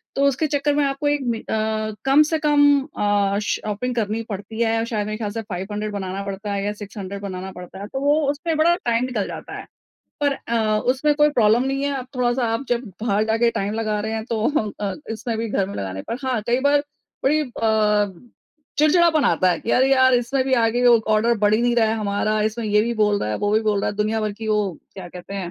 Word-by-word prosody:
तो 275 - +1
उसके 280 +3 +1
चक्कर 290 0 0
में 295 - +2
आपको 275 +2 -1
एक 290 -1 +1
मि 230 -2 0
अ, 215 0 -2
कम 275 +3 +6
से 315 +1 -1
कम 290 -2 +4 0.2
अ, 205 -1 +1
शॉपिंग 215 +5 -2
करनी 220 0 -1
पड़ती 205 +3 -6
है। 225 0 +1
शायद 215 -3 -2
मेरे 215 0 -4
ख़याल 210 -3 -3
से 225 +1 -4
500 205 +1 -5
बनाना 195 0 -4
पड़ता 200 +1 -5
है 200 0 -2
या 205 - -1
600 200 -1 -7
बनाना 190 -1 -6
पड़ता 180 +1 -10
है, 200 - -6
तो 265 - -5
वो 290 +2 +3
उसमें 320 +2 -3
बड़ा 340 +2 +4
टाइम 235 +1 +1
निकल 225 -6 -2
जाता - - -7
है, - - -8 0.6
पर 285 -1 +2 0.2
अ, 220 -2 +1
उसमें 295 +3 +1
कोई 295 0 +4
प्रॉब्लम 235 -1 +3
नहीं 270 +1 -1
है। 285 -1 -1
अब 255 - -7
थोड़ा-सा 245 0 +1
आप 230 +5 -2
जब 245 +1 0 0.2
बाहर 215 -1 +1
जाके 225 +1 +2
टाइम 200 -1 -2
लगा 215 -2 -1
रहे 220 +1 -3
हैं 220 0 -3
तो 225 -1 0
अ, 200 -2 -2 0.2
इसमें 225 +1 -3
भी 230 0 -2
घर 195 -2 0
में 200 - -7
लगाने 95 -1 -5
पर 230 - -2
हाँ, 250 -4 0
कई 245 +2 +2
बार 290 0 +4 0.5
बड़ी 305 +3 +3
अ, 215 - 0 0.5
चिड़चिड़ापन 315 0 +4
आता 185 -1 +3
है - - 0
कि 230 - -3
अरे, 260 +1 +4
यार! 260 -1 +5
इसमें 250 +2 +1
भी 265 - -2
आगे 240 +1 +2
वो 235 -1 +7 0.2
ऑर्डर 230 +2 +3
बढ़ 210 +1 +3
ही 225 - +2
नहीं 240 0 +2
रहा 225 -2 +4
है 220 - +1
हमारा, 210 +1 0
इसमें 220 +2 -2
ये 210 0 +3
भी 235 +1 -1
बोल 210 -2 +2
रहा 105 - -2
है, - - -1
वो 205 0 0
भी 220 - +3
बोल 210 -2 +1
रहा - - 0
है 205 - -9
दुनिया 215 +1 0
भर 215 -1 -2
की 220 +1 -7
वो 210 0 +2 0.3
क्या 185 -2 -8
कहते 180 +3 -9
हैं। 185 -3 -4
220 Hz, 240 wpm, -22 LUFS, 205-255 Hz, 0.6 s, वो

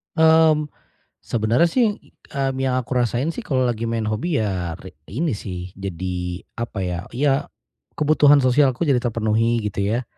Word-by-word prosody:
Mmm, 160 -2 +4 0.5
sebenarnya 120 +9 +2
sih, 245 +2 +3 0.5
mmm, 135 -1 0
yang 130 -1 +1
aku 130 0 -3
rasain 120 +5 0
sih - - -6
kalau 130 -3 0
lagi 115 -1 -1
main 115 -1 -1
hobi 110 +10 -1
ya 90 -5 -2
ri 95 -1 -12 0.2
ini 150 - -1
sih 90 -3 -6
jadi, 90 -1 -4 0.2
apa 115 -3 -4
ya, 90 -1 -2 0.2
ya 135 +1 +1 0.5
kebutuhan 145 -2 +5
sosialku 130 +3 +3
jadi 135 -5 +2
terpenuhi 115 0 0
gitu 100 -1 -3
ya. 110 +5 0
120 Hz, 155 wpm, -22 LUFS, 105-145 Hz, 0.5 s, kebutuhan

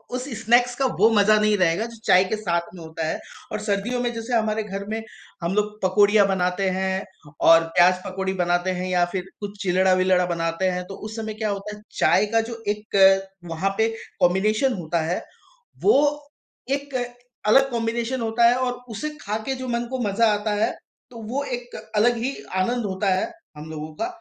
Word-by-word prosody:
उस 255 +2 -4 0.2
स्नैक्स 245 +2 +4
का 270 - 0
वो 220 - +6
मज़ा 215 +1 +5
नहीं 215 0 +3
रहेगा। 185 +3 +2
जो 230 0 -10
चाय 185 - +6
के 205 - -2
साथ 175 -5 0
में 175 - -10
होता 160 0 -5
है - - -2 0.3
और 215 - -2
सर्दियों 215 +4 -1
में 240 -1 0
जैसे 230 +2 -5
हमारे 220 -1 +1
घर 200 -1 -6
में 220 +1 -2 0.4
हम 170 - 0
लोग 210 0 -1
पकोड़ियाँ 205 +2 +4
बनाते 190 0 0
हैं 190 0 -1 0.4
और 165 0 +8
प्याज 180 +1 +5
पकौड़ी 190 0 -3
बनाते 175 +1 +1
हैं 185 - -3
या 180 -1 +3
फिर 185 -2 -2
कुछ 205 0 -7
चिलड़ा-विलड़ा 185 0 +3
बनाते 170 +1 -1
हैं। 180 0 -2
तो 195 - -7
उस 215 +2 -8
इस - - -8
समय 220 -1 -4
क्या 215 0 -2
होता 200 +1 -4
है? 210 - -15 0.2
चाय - - +4
का 225 - +5
जो 230 -1 -7
एक 195 -2 +3 0.3
वहाँ 165 +4 0
पे 220 0 +3 0.3
कॉम्बिनेशन 210 +8 +2
होता 170 -3 -2
है। 165 +3 -1 0.6
वो 415 - +6 0.8
एक 280 0 -3 0.5
अलग 270 +5 +5
कॉम्बिनेशन 235 +2 -2
होता 225 +1 +1
है 240 - +4
और 255 -1 0 0.2
उसे 225 +8 -3
खा 210 +1 -3
के 270 - -1
जो 260 0 -6
मन 235 0 -1
को 260 - -2
मज़ा 205 +4 +2
आता 210 +1 -2
है। - - +1 0.4
तो 235 -2 -10
वो 280 +2 0
एक 245 -2 -6 0.2
अलग 240 +3 +4
ही 260 +4 -2 0.3
आनंद 240 +5 0
होता 190 +1 -1
है, 335 - -1 0.3
हम 155 +1 -9
लोगों 155 0 -6
का। 155 - -2
210 Hz, 200 wpm, -23 LUFS, 185-230 Hz, 0.8 s, और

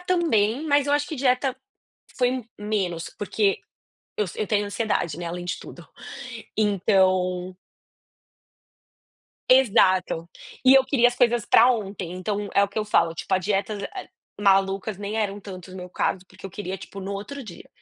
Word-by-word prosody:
também, 310 - +1
mas 285 -1 +3
eu 285 - +3
acho 290 0 0
que 315 - -5
dieta 255 0 +1 0.6
foi 250 0 +1 0.2
menos, 195 -6 -2
porque 205 -1 0 0.6
eu 210 - +1
s 170 - -9
eu 215 - 0
tenho 205 -1 +1
ansiedade, 205 -6 -1
né, 175 - -5
além 175 +1 -5
de 175 - -2
tudo, 175 - -12 0.7
então 185 -3 +2 2.0
Exato. 190 -9 +4 0.4
E 260 +1 +8
eu 270 - +6
queria 260 -3 +4
as 245 - -5
coisas 240 -2 +3
pra 240 +3 +6
ontem, 195 -6 -3
então 200 +3 -3
é 200 - +5
o 200 - +1
que 200 - -4
eu 215 - 0
falo, 170 -5 +2
tipo, 165 - -6
a 185 - +3
dieta 200 +2 -1 0.2
as 380 - -7 0.3
malucas 195 0 +2
nem 205 +2 -4
eram 205 -2 -1
tanto 185 -2 -10
o - - -9
meu 180 -1 -7
caso, 185 +1 -1
porque 185 +1 -11
eu - - -10
queria, 190 0 -5
tipo, 195 - -9
no 195 +1 -5
outro 240 +8 -6
dia, 205 -8 -11
205 Hz, 170 wpm, -24 LUFS, 185-240 Hz, 2.0 s, E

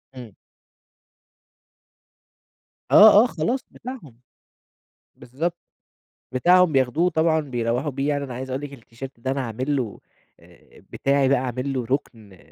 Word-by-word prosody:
إمم. 120 -6 -11 2.6
آه، 210 +1 +8
آه - - +1
خلاص 235 +11 -2
بتاعهم، 225 - -10 1.0
بالضبط 165 +8 -4 0.8
بتاعهم 175 +6 +4
بياخدوه 140 +6 +2
طبعًا 160 -1 +1
بيروّحوا 125 -1 -2
بيه، 135 +2 -2
يعني 145 -1 -1
أنا 130 -3 -7
عايز 130 +2 -6
أقول 130 +2 -3
لِك 145 -1 -7
إن - - -10
التيشيرت 120 +2 -11
ده 130 +3 -3
أنا 135 0 -2
عامل 130 +5 -3
له 120 -7 -4 0.4
آآ، - - -21
بتاعي 140 -1 +1
بقى 140 - +3
عامل 130 +2 -3
له 125 -3 -3
ركن 110 -7 -5
135 Hz, 135 wpm, -23 LUFS, 125-155 Hz, 2.6 s, آه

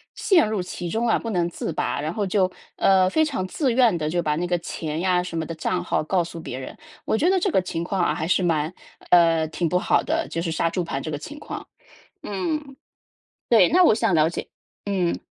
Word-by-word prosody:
陷 345 - +3
入 215 -3 -1
其 180 -1 -6
中 230 +5 0
啊， 225 - +3
不 230 - -5
能 175 -2 0
自 165 - -4
拔， 180 -4 -1
然 155 +3 -3
后 205 -3 -1
就， 185 -1 +1 0.2
呃， 190 -1 +4
非 315 +9 +2
常 265 -11 -2
自 260 - 0
愿 235 -8 +4
地， 150 -1 -2
就 175 +2 0
把 150 -2 0
那 175 +3 -1
个 175 0 0
钱 160 -2 -4
呀 180 -1 +2
什 180 -2 -6
么 160 - -1
的 165 +1 -6
账 180 +2 -2
号 165 - 0
告 175 +2 +1
诉 170 0 -8
别 130 -5 -6
人， 130 - -8 0.3
我 220 - +1
觉 330 - +2
得 380 - +3
这 385 +2 +1
个 - - +3
情 175 -2 -3
况 190 +2 -2
啊 175 - +2
还 160 - -3
是 185 0 +2
蛮， 160 -1 +1 0.4
呃， 165 -2 +5
挺 170 +2 -2
不 180 +2 +1
好 - - +2
的， 325 +1 -1
就 165 - -3
是 165 -1 -2
杀 165 +1 0
猪 180 +1 -2
盘 140 -5 -4
这 155 - -5
个 150 - -3
情 295 - -9
况。 - - -7 0.6
嗯， 275 - -3 0.7
对， - - +6
那 365 +1 +5
我 325 - +6
想 220 -5 +1
了 155 +1 +4
解 - - -5 0.4
嗯。 185 -4 0
180 Hz, 260 characters per minute, -23 LUFS, 165-215 Hz, 0.7 s, 对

